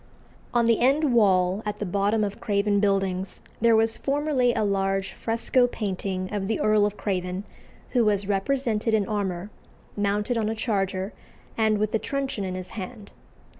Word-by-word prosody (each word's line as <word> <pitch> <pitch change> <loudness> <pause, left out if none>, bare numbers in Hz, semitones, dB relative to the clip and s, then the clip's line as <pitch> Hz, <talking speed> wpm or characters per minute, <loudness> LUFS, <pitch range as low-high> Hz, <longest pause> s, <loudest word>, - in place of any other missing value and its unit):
On 240 -1 +2
the 230 -1 +3
end 275 +2 +3
wall 190 -3 +3
at 210 -1 -3
the 210 - -3
bottom 205 +3 +1
of 205 +2 -3
Craven 205 -2 +1
Buildings 195 -2 0 0.2
there 230 0 +5
was 225 0 +2
formerly 280 -3 +1
a 220 - 0
large 195 -1 0
fresco 235 +2 +1
painting 190 -4 -3
of 195 -2 -2
the 220 - -1
Earl 210 -1 +3
of 210 - -6
Craven, 185 -1 -2 0.5
who 245 -2 +3
was 205 -2 +1
represented 220 +2 0
in 205 -3 +1
armour, 200 -2 -2 0.4
mounted 205 +3 0
on 215 -1 0
a 220 - -2
charger, 195 -3 -1 0.4
and 220 -1 +2
with 215 0 -1
a 225 - +2
truncheon 275 -6 -2
in 185 -1 -3
his 185 0 -6
hand. 210 0 -8
210 Hz, 170 wpm, -25 LUFS, 195-230 Hz, 0.5 s, there